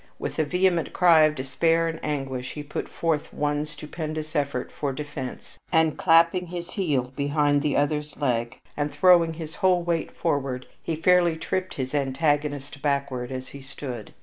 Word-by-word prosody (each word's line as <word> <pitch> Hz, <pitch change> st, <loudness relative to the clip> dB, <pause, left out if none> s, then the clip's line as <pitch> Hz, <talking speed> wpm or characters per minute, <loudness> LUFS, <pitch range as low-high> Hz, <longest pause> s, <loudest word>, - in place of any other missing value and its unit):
With -, -, -4 dB
a -, -, +4 dB
vehement 180 Hz, +2 st, +1 dB
cry 165 Hz, -3 st, +6 dB
of 155 Hz, 0 st, +1 dB
despair 165 Hz, +5 st, +1 dB
and 165 Hz, 0 st, -4 dB
anguish, 135 Hz, -4 st, -3 dB
he 150 Hz, -, -6 dB
put 145 Hz, -, -5 dB
forth 160 Hz, -3 st, -1 dB
one 145 Hz, 0 st, -1 dB
stupendous 155 Hz, 0 st, -6 dB
effort 140 Hz, -3 st, -1 dB
for 140 Hz, -2 st, -2 dB
defense, 140 Hz, -2 st, -7 dB
and, 160 Hz, -2 st, +3 dB
clapping 170 Hz, +1 st, +4 dB
his 175 Hz, +1 st, -6 dB
heel 140 Hz, -, -1 dB
behind 145 Hz, 0 st, +2 dB
the 145 Hz, -1 st, +1 dB
other's 150 Hz, +1 st, -1 dB
leg, 120 Hz, -3 st, -1 dB, 0.2 s
and 145 Hz, 0 st, -1 dB
throwing 175 Hz, -3 st, +5 dB
his 160 Hz, -1 st, -7 dB
whole 180 Hz, -2 st, +4 dB
weight 170 Hz, -1 st, -1 dB
forward, 135 Hz, -5 st, -1 dB, 0.2 s
he 165 Hz, -, -2 dB
fairly 175 Hz, +1 st, +4 dB
tripped 185 Hz, +3 st, -3 dB
his 130 Hz, 0 st, -4 dB
antagonist 145 Hz, 0 st, 0 dB
backward 140 Hz, -3 st, -1 dB
as 130 Hz, 0 st, -5 dB
he 140 Hz, -, -10 dB
stood. 130 Hz, -4 st, -8 dB
150 Hz, 165 wpm, -25 LUFS, 140-165 Hz, 0.2 s, cry